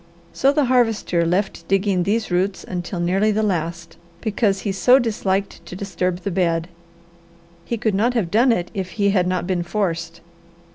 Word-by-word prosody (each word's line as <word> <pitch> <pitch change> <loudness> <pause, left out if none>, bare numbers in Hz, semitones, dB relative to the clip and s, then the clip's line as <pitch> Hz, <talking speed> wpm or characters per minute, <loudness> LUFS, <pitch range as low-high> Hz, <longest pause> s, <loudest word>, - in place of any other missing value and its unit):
So 275 - +3
the 290 -1 +2
Harvester 225 -8 +2
left 180 -1 -1
digging 195 -1 +1
these 210 +3 -1
roots 190 +2 0
until 180 0 -5
nearly 190 +5 +2
the 215 +1 0
last, 170 -3 -3 0.2
because 205 -1 0
he 200 - -2
so 250 +7 +5
disliked 200 -7 -1
to 180 - -8
disturb 185 -2 -2
the 200 - -3
bed. 170 -2 0 1.0
He 235 - -2
could 220 -1 0
not 235 +6 +1
have 190 -8 0
done 240 +5 +4
it 175 -6 -1
if 190 -2 -4
he 200 -2 +2
had 185 -3 +2
not 180 -1 -1
been 180 -1 -1
forced. 170 -3 -3
195 Hz, 175 wpm, -21 LUFS, 175-215 Hz, 1.0 s, so